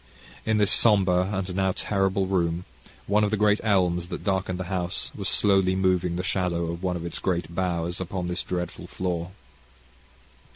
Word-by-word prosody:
In 110 -1 +2
this 105 -2 +3
sombre 95 -4 +4
and 95 -2 -3
now 95 -1 +1
terrible 95 -1 0
room, 90 -2 0 0.4
one 105 +1 +2
of 105 - +2
the 110 - 0
great 105 0 +3
elms 90 -5 +1
that - - -6
darkened 95 -2 -1
the - - -2
house 90 -1 -1
was - - -2
slowly 95 -2 +4
moving 90 -2 +1
the 90 - -2
shadow 85 -3 -1
of 85 +1 -7
one 90 -1 -1
of 85 -1 -5
its 85 - -4
great 85 -3 -2
boughs 85 -1 -2
upon 90 0 -3
this 90 +1 -1
dreadful 90 -1 -5
floor. 90 -2 -3
95 Hz, 175 wpm, -25 LUFS, 90-95 Hz, 0.4 s, sombre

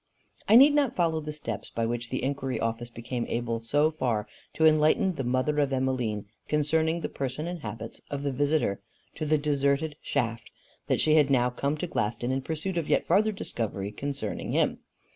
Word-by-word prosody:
I 220 - +7
need 280 +4 +9
not 285 -4 +2
follow 165 -3 +1
the 150 0 -5
steps 150 0 -5
by 115 - -1
which 120 +1 -3
the 130 - -3
inquiry 135 -1 -2
office 115 +1 -2
became 120 +1 -4
able 115 -1 -2
so 145 +7 +2
far 120 -9 -1 0.3
to 160 - +3
enlighten 155 +4 +4
the 135 -5 -4
mother 130 +4 +1
of 140 -2 +2
Emmeline 130 -6 -1 0.2
concerning 160 +2 +1
the - - -2
person 140 +3 -4
and 175 0 -4
habits 115 -2 -7
of 140 0 -4
the 140 - 0
visitor 140 -7 +1 0.3
to 155 - -4
the 155 +1 +4
deserted 145 +1 +1
shaft, 115 -5 -2 0.4
that - - +1
she 155 0 +4
had 145 -2 +4
now 125 -2 +3
come 140 +4 -1
to 165 - -2
Glaston 120 -4 -1
in 135 +1 0
pursuit 165 +5 -2
of 160 - -5
yet - - +2
farther 215 +2 +3
discovery 105 - -4
concerning 135 -1 -4
him. - - +1
140 Hz, 190 wpm, -28 LUFS, 120-155 Hz, 0.4 s, need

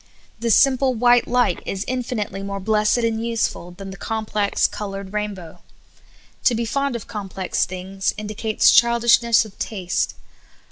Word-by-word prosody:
The 235 - -1
simple 260 +2 +4
white 240 +1 +4
light 245 -7 +1
is 195 +1 -4
infinitely 230 -5 -3
more 200 0 -4
blessed 210 +3 +2
and 230 -1 0
useful 230 -6 -2
than 195 +2 -9
the 195 - -9
complex, 215 -1 -1
colored 195 -1 -4
rainbow\ 200 -6 -5 0.9
To 245 - +4
be 230 +1 -1
fond 275 +3 -1
of 230 - -5
complex 195 -3 -3
things 185 +1 -3
indi 210 0 -5
cates 215 0 +3
childishness 235 -1 +4
of 210 - -14
taste. 185 -5 -2
215 Hz, 145 wpm, -21 LUFS, 195-235 Hz, 0.9 s, simple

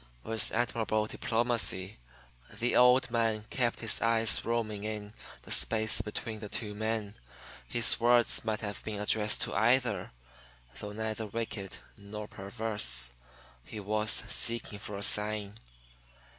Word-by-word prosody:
With 110 -1 -2
admirable 115 -2 -1
diplomacy 115 -5 -1 0.5
the 120 +1 -2
old 125 0 +5
man 115 -2 0
kept 120 -3 -1
his 115 -2 +3
eyes 115 -1 +2
roaming 110 -3 -2
in 105 -1 -5 0.3
the - - -9
space 110 -1 +3
between 110 +1 -6
the 105 -1 -8
two 105 0 -3
men. 110 -1 -3 0.5
His 120 - +4
words 120 0 +4
might 110 -1 -2
have 105 -3 -6
been 105 -2 -5
addressed 105 0 +2
to - - -3
either. 115 -2 +1 0.7
Though 105 0 -7
neither 110 0 -4
wicked 105 -2 -5 0.2
nor 105 +1 -8
perverse, 95 - -1 0.5
he 110 - -8
was 105 +1 +2
seeking 115 -3 0
for 105 -1 -7
a 100 - -5
sign. 105 0 +3
110 Hz, 130 wpm, -30 LUFS, 105-115 Hz, 0.7 s, old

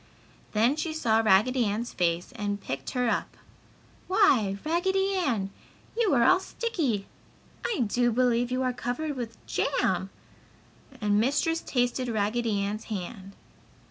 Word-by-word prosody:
Then 235 +7 +3
she 315 0 -2
saw 225 -8 +2
Raggedy 225 +4 +4
Ann's 215 +4 -2
face 170 +2 0
and 205 -3 -2
picked 135 -8 -5
her 250 -1 +2
up. 230 - -1 0.7
"Why 265 - +3
Raggedy 380 +4 +1
Ann, 235 - 0 0.4
you 460 -3 +2
are 240 - +4
all 370 +10 +6
sticky! 315 - -2 0.6
I 430 - -1
do 240 +2 +2
believe 245 0 +2
you 255 +1 0
are 255 -1 0
covered 250 +6 -3
with 235 -3 -6
jam!" - - 0 0.9
and 205 -2 +2
Mistress 290 +7 +1
tasted 245 0 0
Raggedy 220 0 0
Ann's 205 +2 -3
hand. 195 -1 -6
240 Hz, 135 wpm, -27 LUFS, 210-290 Hz, 0.9 s, all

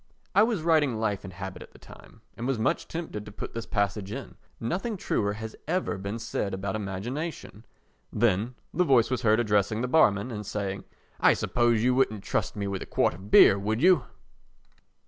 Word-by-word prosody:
I - - +6
was 220 -7 +1
writing 150 -8 +2
Life 105 -3 -1
and 95 - -8
Habit 95 +1 -7
at - - -12
the - - -15
time - - -16
and 120 - -4
was 135 -2 0
much 110 - 0
tempted 160 -11 -5
to 105 - -10
put 105 - -7
this 115 0 -5
passage 100 -1 -1
in. - - -7 0.2
Nothing 195 - -2
truer 100 - -1
has 110 +1 -7
ever 180 - -1
been 100 +3 -4
said 100 -3 -3
about 95 +1 -3
imagination. 110 - -5 0.5
Then 110 +2 +1 0.2
the 180 - +3
voice 130 -7 +3
was 130 -1 0
heard 110 -2 +3
addressing 105 -1 +1
the 125 - -1
barman 120 -5 +3
and 105 -2 -5
saying: 100 -1 -4 0.3
"I - - +6
suppose 120 -2 +1
you 125 +1 +3
wouldn't 110 -6 +1
trust - - -1
me 100 -1 -3
with 100 -1 -3
a - - -7
quart - - +1
of 95 +4 -11
beer, 100 -2 +7
would 110 +3 -1
you?" 180 -7 +5
110 Hz, 195 wpm, -27 LUFS, 100-130 Hz, 0.5 s, beer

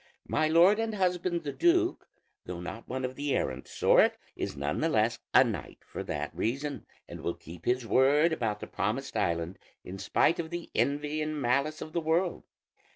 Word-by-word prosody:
My 155 - +2
lord 175 +7 +5
and 225 -1 -1
husband 180 -2 0
the 145 - -3
duke, 350 +1 +2 0.4
though 90 -1 -5
not 100 +6 -7
one 130 +1 -2
of 130 - -4
the 145 0 -1
errant 65 0 -2
sort, - - +4 0.2
is 70 - -4
none 70 +2 -2
the 165 - +1
less 115 -3 +2
a - - +7
knight - - -4
for - - -6
that - - -4
reason, 140 +5 -2 0.2
and - - -8
will - - -2
keep 85 +2 -12
his 125 0 +1
word 145 +7 +4
about 110 -8 -2
the - - -4
promised 110 +9 -3
island 85 -3 -1 0.2
in 95 +2 -8
spite 160 - +2
of 160 -1 -3
the 175 0 -6
envy 145 +2 0
and 155 0 -2
malice 140 +5 0
of 155 - -11
the 170 - 0
world. 165 +3 0
145 Hz, 190 wpm, -29 LUFS, 110-165 Hz, 0.4 s, a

